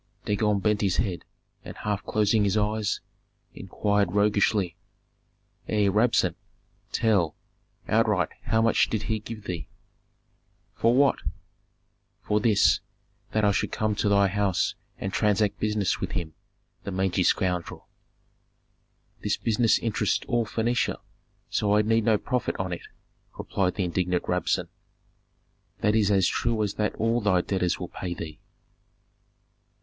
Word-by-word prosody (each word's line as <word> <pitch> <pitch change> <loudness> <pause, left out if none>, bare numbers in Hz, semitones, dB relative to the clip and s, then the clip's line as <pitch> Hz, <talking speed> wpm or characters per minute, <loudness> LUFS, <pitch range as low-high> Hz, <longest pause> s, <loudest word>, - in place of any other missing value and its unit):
Dagon 105 0 +1
bent 105 +1 +1
his 95 -3 +1
head, 95 -6 -2 0.4
and - - -9
half 105 -1 -2
closing 105 0 +2
his 100 +1 +1
eyes, 105 0 0 0.5
inquired 100 0 -1
roguishly, 105 -3 +2 0.9
"Ei, 105 -2 +2
Rabsun! 110 +4 +2 0.6
Tell, 100 -9 +2 0.5
outright - - +2 0.2
how 110 0 +2
much 115 - +3
did 110 -2 -2
he 110 0 -1
give 110 0 -8
thee?" 85 -5 -5 1.1
"For 115 +2 +2
what?" 140 +1 +4 1.0
"For 105 - +1
this, 105 -2 +4 0.5
that 110 -1 +2
I 100 - +4
should - - -1
come 110 0 0
to 105 - +1
thy 100 -1 +4
house 100 -1 0 0.2
and 95 0 -4
transact 105 -1 +1
business 105 -3 0
with - - -3
him, 80 -2 -3 0.5
the - - -5
mangy 95 -1 0
scoundrel." 90 -1 0 1.3
"This - - 0
business 115 0 +2
interests 115 -3 -1
all 120 -3 +1
Phœnicia, 120 +3 0 0.5
so 105 0 +2
I 105 - +4
need 115 0 +2
no 110 -2 +4
profit 125 +4 -2
on 95 -1 -2
it," 85 - -7 0.5
replied 90 -2 -1
the 95 - -1
indignant 90 0 0
Rabsun. - - 0 1.1
"That 105 +1 +2
is 105 -3 +3
as 95 -3 +3
true 115 -2 0
as 105 - -2
that 105 0 -1
all 115 +2 +1
thy 95 -4 +3
debtors 90 -2 -1
will - - -5
pay 90 -2 -5
thee." 80 -3 -7
105 Hz, 135 wpm, -26 LUFS, 95-110 Hz, 1.3 s, what